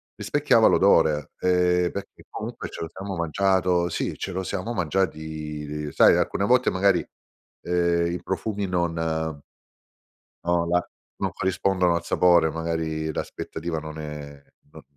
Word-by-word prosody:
Rispecchiava - - +2
l'odore, 75 -2 +4
ehm, 90 -1 +2
perché 100 - -8
comunque - - -6
ce - - -8
lo 80 - -3
siamo 95 +1 -6
mangiato, 90 +1 +1
sì 85 - -3
ce 95 - -4
lo 95 - -2
siamo 100 +5 -3
mangiati 75 -6 -3
sai - - +6
alcune 100 - 0
volte 125 +3 +4
magari, 95 -2 +2 0.6
ehm, 85 -1 +1
i 90 - -4
profumi 100 +2 -2
non, 85 -2 -1
ehm 80 -2 -2 1.0
no 85 0 +1
la 90 0 +2 0.3
non - - -2
corrispondono 95 -1 +1
al 85 - -3
sapore, 85 -3 +4
magari 80 -1 -2
l'aspettativa 85 +2 -4
non 80 0 -7
è 75 -2 -8 0.3
non 80 -1 -13
85 Hz, 135 wpm, -25 LUFS, 80-95 Hz, 1.0 s, sai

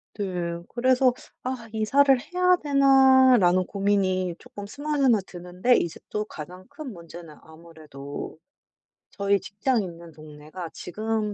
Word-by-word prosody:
네. 175 -4 -3
그래서 255 +1 +2 0.3
'아 250 -3 -5
이사를 270 +5 +3
해야 360 +5 +2
되나?'라는 260 -9 +5
고민이 190 -3 0
쪼끔 225 -5 -10
스멀스멀 275 -3 +1
드는데 180 +7 0
이제 170 - -3
또 210 0 -2
가장 180 +1 -10
큰 305 -5 -8
문제는 170 -3 -12
아무래도 160 -3 -10 0.7
저희 200 -1 +1
직장이 215 +3 -1
있는 170 -1 -11
동네가 155 +3 -10
지금 215 +2 -3
200 Hz, 270 characters per minute, -25 LUFS, 170-255 Hz, 0.7 s, 되나?'라는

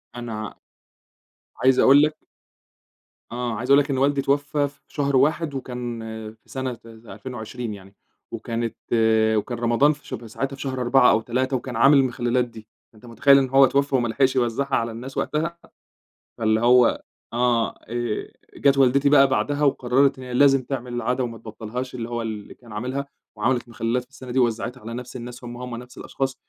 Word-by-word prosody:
أنا 110 -3 -6 1.0
عايز 130 0 +3
أقول 140 +2 +7
لك 155 0 +1 1.2
آه، 120 -1 -3
عايزة 125 +3 -2
أقول 140 - +8
لك 140 - -11
إن 130 - 0
والدي 140 +1 +2
اتوفّى 145 +1 0
في 140 0 -16
شهر 140 -2 -1
1 150 +3 +2
وكان 125 -3 -5 0.3
في 110 - -30
سنة 130 -3 -4
2020 115 +1 -7
يعني 100 0 -13 0.4
وكانت 115 0 -3 0.6
وكان 120 +3 -3
رمضان 120 +5 +3
في 145 - -17
شب 115 +1 -7
ساعتها 135 +5 -4
في 135 - -11
شهر 130 -2 -3
4 125 +1 +5
أو 110 - +2
3 130 +3 -1
وكان 125 0 -7
عامل 135 +5 +6
المخلّلات 125 -1 +1
دي، 110 -2 -13 0.3
أنت 110 - -17
متخيل 140 +4 +5
إنه 135 -2 +1
هو 135 0 +7
اتوفّى 140 +1 +1
وما 120 -2 +2
لحِقش 130 +3 +1
يوزّعها 130 +3 0
على 115 0 -1
الناس 125 +4 -8
وقتها؟ 160 +3 -1 0.8
فاللي 110 -1 +2
هو 125 0 +4 0.3
آه 120 -1 +2
آآ، 120 -1 -4 0.2
جات 140 -1 +3
والدتي 135 +2 +4
بقى 140 -2 +6
بَعدها 145 +2 0
وقرّرِت 135 0 +2
هي 125 -1 -7
لازم 135 0 +4
تعمِل 125 -2 -5
العادة 125 +2 -1
وما 115 -1 -5
تبطّلهاش، 115 +3 -6
اللي 120 -1 -5
هو 120 0 -3
اللي 110 -3 -6
كان 120 -2 -17
عامِلها 130 +6 -4 0.3
وعملِت 120 +2 0
مخلّلات 115 +2 -1
في 125 - -29
السَّنة 130 -2 -10
دي 130 - +1
ووزّعِتها 120 +1 -1
على 115 +2 -7
نفْس 125 +1 -7
الناس 125 +1 -8
هُم، 120 0 -7
هُم 125 -1 -6
نفْس 125 +1 -11
الأشخاص 135 -1 -3
125 Hz, 175 wpm, -23 LUFS, 115-135 Hz, 1.2 s, أقول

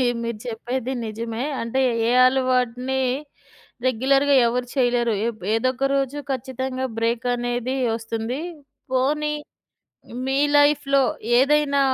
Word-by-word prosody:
మీ - - +3 0.2
మీరు 230 -2 -3
చెప్పేది 245 +3 -3
నిజమే. 230 +2 -4 0.2
అంటే 230 +3 -1 0.3
ఏ - - +3 0.2
అలవాటుని, 255 0 +1 0.8
రెగ్యులర్‌గా 270 +3 +3
ఎవరు 245 +1 -1
చేయలేరు. 245 -3 +2 0.2
ఎబ్ 220 -5 -7
ఏదోక 255 +3 +1
రోజు 275 +1 -1
ఖచ్చితంగా 260 0 -3
బ్రేక్ 230 +1 0
అనేది 245 +1 -2 0.2
ఒస్తుంది. 225 +3 -4 0.5
పోనీ 295 +4 +1 1.0
మీ 270 +1 +1 0.2
లైఫ్‌లో 290 -1 +4 0.4
ఏదైనా 280 +1 +3
255 Hz, 105 wpm, -23 LUFS, 235-270 Hz, 1.0 s, లైఫ్‌లో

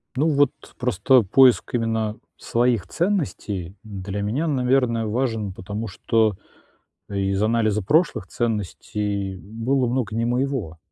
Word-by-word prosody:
Ну, 150 +5 +2
вот 145 -3 +3 0.3
просто 125 +1 +3
поиск 125 +6 +4
именно 110 -2 0 0.2
своих 120 -4 +1
ценностей 120 - -2
для 100 -1 -5
меня, 120 +11 -1
наверное, 125 -4 +2
важен, 110 -2 -1
потому 100 +4 -5
что 110 +1 +1 0.7
из 100 0 0
анализа 110 -1 +2
прошлых 145 - +2
ценностей 105 -3 -2
было 115 +7 -1
много 120 -3 -1
не 115 - +1
моего. 120 - -1
115 Hz, 115 wpm, -23 LUFS, 100-125 Hz, 0.7 s, поиск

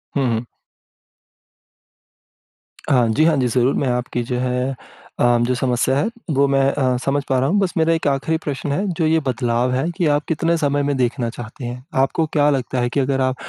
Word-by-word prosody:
हुँ, 135 -2 +1
हुँ। 115 +1 -3 2.4
हाँ 125 -4 +4
जी, 140 +8 +2
हाँ 160 -2 +4
जी, 125 -2 +1
ज़रूर 125 +2 +2
मैं 135 - 0
आपकी 125 0 -2
जो 125 +1 -3
है 125 +1 -1 0.5
अ, 120 0 +4
जो 125 +1 +1
समस्या 125 +1 +1
है 195 - +1 0.3
वो 140 0 +4
मैं 135 0 +2
अ, 130 -3 0
समझ 140 +1 0
पा 130 - +2
रहा 135 - +1
हूँ 205 - +2
बस 195 -2 0
मेरा 165 0 +3
एक 165 - -1
आखिरी 145 +4 0
प्रश्न 145 0 -3
है, 195 +8 -1
जो 165 -3 -1
ये 160 +1 +3
बदलाव 120 0 0
है 130 +4 0 0.2
ये 170 - +3
आप 145 - -1
कितने 165 +1 +1
समय 145 -2 0
में 145 0 0
देखना 120 -1 0
चाहते 120 +2 -8
हैं? 125 +1 -6 0.2
आपको 160 +4 +1
क्या 150 -1 +4
लगता 130 -2 -1
है 120 - 0
कि 140 - -1
अगर 135 0 0
आप 130 0 +1
135 Hz, 210 wpm, -20 LUFS, 125-145 Hz, 2.4 s, हाँ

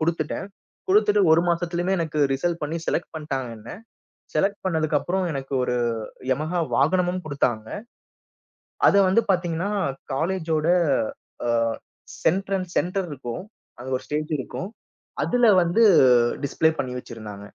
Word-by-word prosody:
குடுத்துட்டேன். 160 +2 -1 0.4
குடுத்துட்டு 210 +1 +4
ஒரு 160 - +6
மாசத்துலயுமே 175 +2 0
எனக்கு 155 -2 -2
ரிசல்ட் 170 +5 -1
பண்ணி 150 +2 -2
செலக்ட் 170 - -1
பண்ட்டாங்க 135 -5 -3
என்ன. 110 +2 -12 0.7
செலக்ட் 200 +1 +1
பண்ணதுக்கு 160 -4 +1
அப்புறம் 185 +1 -1
எனக்கு 135 -1 -6
ஒரு 125 - -1 0.5
யமஹா 155 +7 0 0.2
வாகனமும் 180 +3 +2
குடுத்தாங்க. 120 -6 -1 1.2
அதை 200 - +6
வந்து 195 +5 +4
பாத்தீங்கன்னா 175 +1 0 0.4
காலேஜோட, 160 0 0 0.8
அ, - - 0 0.7
சென்ட்ரன்ஸ் 190 0 0
சென்டர் 185 0 -1
இருக்கும், 120 +2 -6 0.4
அங்க 130 +2 -7
ஒரு - - -15
ஸ்டேஜ் 150 +1 -3
இருக்கும். 160 +7 -5 0.6
அதுல 245 -1 +3 0.2
வந்து 175 +7 +2 0.6
டிஸ்ப்ளே 160 +3 +2
பண்ணி 125 -1 -4
வச்சிருந்தாங்க. 110 -5 -9
165 Hz, 120 wpm, -24 LUFS, 140-185 Hz, 1.2 s, ஒரு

